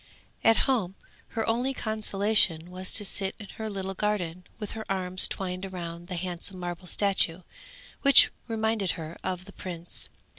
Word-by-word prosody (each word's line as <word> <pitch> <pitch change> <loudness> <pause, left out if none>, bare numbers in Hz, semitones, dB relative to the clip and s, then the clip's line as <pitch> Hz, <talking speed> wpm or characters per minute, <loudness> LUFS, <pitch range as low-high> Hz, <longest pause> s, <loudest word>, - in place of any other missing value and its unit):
At 225 -1 +6
home 210 -9 +1 0.4
her 225 - +1
only 245 +4 +1
consolation 205 -6 +2
was 185 0 -5
to 205 - -1
sit 195 0 0
in 205 - -9
her 220 0 -2
little 195 -1 -4
garden 180 -4 -1
with 210 -3 -5
her 220 - -5
arms 185 -1 +2
twined 185 0 -4
round 170 -1 -6
the 180 - -4
handsome 180 +2 -4
marble 175 0 -5
statue 190 -2 +1 0.6
which 275 -1 +9 0.2
reminded 220 -4 0
her 165 0 -6
of 185 0 -3
the 200 - -12
prince. 175 -2 -6
190 Hz, 155 wpm, -28 LUFS, 180-215 Hz, 0.6 s, which